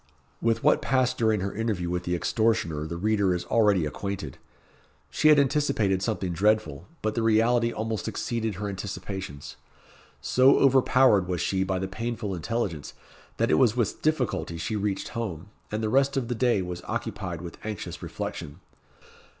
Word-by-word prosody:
With 115 -1 +1
what - - +4
passed 130 -1 +1
during 110 -3 +2
her 100 +1 -3
interview 105 -5 -2
with 90 0 -2
the 90 - 0
extortioner 85 -6 0
the 85 +2 -5
reader 100 -1 +2
is 90 - -4
already 105 -7 +3
acquainted. 85 -2 -5 0.7
She 155 - +2
had 150 -1 +7
anticipated 135 -9 +2
something 95 -2 -2
dreadful; 95 -5 +1 0.2
but 110 0 0
the 115 - -1
reality 115 +2 +3
almost 110 -1 -3
exceeded 115 -3 -2
her 105 +3 -4
anticipations. 95 -6 -6 0.6
So 130 +2 +4
overpowered 130 -7 +4
was 90 -2 -2
she 95 -1 0
by 95 0 -1
the 95 +1 -2
painful 110 +1 -4
intelligence, 90 -3 -3 0.4
that - - +1
it 80 - +4
was 115 0 +3
with 115 -5 -1
difficulty 130 - -1
she 95 +7 -3
reached 100 -2 -2
home, 100 -5 -5 0.2
and 110 +1 -2
the - - +1
rest 135 +4 +2
of 125 -3 -1
the - - 0
day 120 -4 +2
was 90 -1 -6
occupied 90 -3 -4
with 85 - -9
anxious 105 -2 -6
reflection. 75 +4 -6
105 Hz, 165 wpm, -26 LUFS, 90-115 Hz, 0.7 s, had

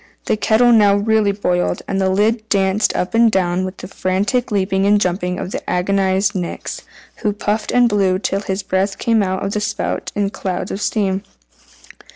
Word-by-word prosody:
The - - +1
kettle 225 +3 +3
now 205 -3 +5
really 210 0 +2
boiled, 180 -3 -1
and 195 - -1
the 190 - +2
lid 215 +3 +1
danced 195 +1 +1
up 180 - -2
and 230 0 +4
down 180 -1 0
with 185 0 -5
the - - -8
frantic 200 +6 -1
leaping 195 -1 +1
and 205 0 +4
jumping 180 -1 -1
of 185 - -5
the - - -5
agonized 190 +2 +1
Nix, 180 -3 -5 0.4
who 210 - -1
puffed 210 +1 -2
and 245 -1 +4
blew 195 -4 +2
till 195 0 -2
his 195 0 -3
breath 195 +1 -1
came 230 -2 +2
out 190 -1 -1
of 195 - -2
the 210 - -2
spout - - -3
in 200 -1 0
clouds 185 -2 -4
of 195 - -4
steam. 195 -3 0
200 Hz, 190 wpm, -18 LUFS, 190-210 Hz, 0.4 s, now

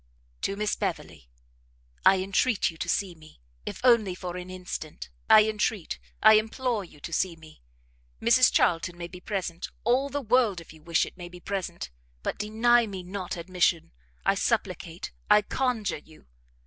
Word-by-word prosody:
To 195 - -1
Miss 210 +1 0
Beverley. 150 - -4 0.7
I 190 0 +6
entreat 195 +1 +1
you 165 - -15
to - - -4
see 195 -3 0
me! 155 -1 -17 0.3
if - - -5
only 230 -7 +4
for 180 -1 -6
an 180 0 -7
instant, 180 - -7 0.2
I 215 0 +8
entreat, 210 -4 -1 0.2
I 215 0 +9
implore 225 0 -2
you 160 -4 -15
to 170 - -7
see 175 +1 0
me! 160 - -16 0.6
Mrs 245 +2 +5
Charlton 175 0 +2
may 170 -1 -5
be 180 +1 -11
present, 180 -4 -4
all 255 +5 +2
the 285 +1 -2
world, 230 -5 +3
if 165 - -13
you 160 - -17
wish 165 +1 +1
it, - - -12
may 175 -2 -8
be 180 0 -12
present, 175 - -4 0.3
but - - -3
deny 225 +3 +3
me 190 -3 -6
not 185 0 -5
admission, 175 -1 0 0.3
I - - +4
supplicate, - - -2 0.2
I 210 - +6
conjure 245 - -1
you! 155 - -19
190 Hz, 170 wpm, -27 LUFS, 170-215 Hz, 0.7 s, I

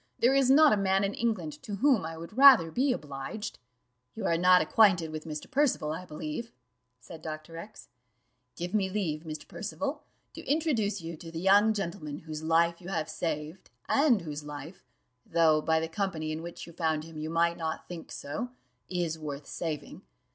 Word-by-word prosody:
There 245 +3 +4
is 275 -2 +4
not 295 +1 +7
a - - +3
man 195 0 +2
in 200 +1 0
England 210 -10 -2
to 215 -6 -5
whom 250 - +3
I 165 0 -7
would 170 +5 -9
rather 260 -12 +8
be 265 - +2
obliged." 150 - -5 0.6
"You 220 - -4
are 165 - +2
not 180 +2 +6
acquainted 180 -2 +4
with 155 0 -6
Mr. 155 -2 -6
Percival, 260 - +2
I 170 +4 -5
believe," 155 +8 -5 0.5
said 160 +5 -11
Dr. 155 +1 -7
X: 200 +6 -10 0.7
"give 175 +2 -5
me 200 -3 +2
leave, 180 -7 -2
Mr. 155 -1 -7
Percival, 280 +7 -4 0.3
to - - -9
introduce 275 -10 +1
to 170 - -9
you 165 -1 -6
the 165 0 -8
young 200 +4 +5
gentleman 170 -7 -4
whose 155 -1 -6
life 170 +2 +2
you 175 - -10
have 165 -5 -2
saved, 155 +2 -4 0.2
and 275 -7 +4
whose 150 -2 -5
life 150 +4 -9 0.4
though, 160 -2 +3
by 160 +1 +2
the 160 - -2
company 165 -3 -2
in 155 +1 -4
which 170 +1 -8
you 170 - -13
found 160 -2 0
him, 165 0 -12
you 155 +1 -4
might 170 +1 +2
not 160 -1 -4
think 170 -2 -8
so 225 +13 -4 0.4
is 170 -3 -2
worth 145 -2 -6
saving. 160 -3 -5
170 Hz, 185 wpm, -29 LUFS, 155-210 Hz, 0.7 s, rather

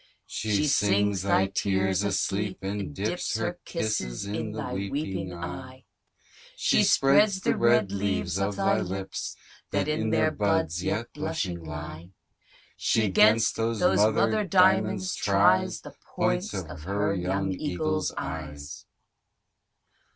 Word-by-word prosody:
She 110 +6 -1
sings 105 - +2
thy 100 0 +2
tears 95 -1 0
asleep, 100 -1 -1
and 100 -3 -3
dips 70 - -2
Her - - -3
kisses 80 - -2
in 105 +2 -4
thy 110 -1 -5
weeping 95 -3 -3
eye, 90 +10 -8 0.7
She - - +3
spreads 190 +9 +4
the - - +1
red 120 -4 +3
leaves 95 -2 -1
of 100 +1 -1
thy - - +2
lips, 95 +1 -5 0.3
That - - -1
in - - 0
their - - +2
buds 85 +3 0
yet 115 +5 -2
blushing 150 - -3
lie. 80 +1 -8 0.7
She 110 -3 +1
'gainst 110 +4 +4
those 115 -1 -1
mother 105 - +3
diamonds 190 0 +3
tries 100 -2 +2
The - - -11 0.2
points - - 0
of - - -6
her 100 +4 -1
young 95 +1 -1
eagle's 90 -1 -2
eyes. 75 -2 -6
100 Hz, 120 wpm, -27 LUFS, 90-110 Hz, 0.7 s, spreads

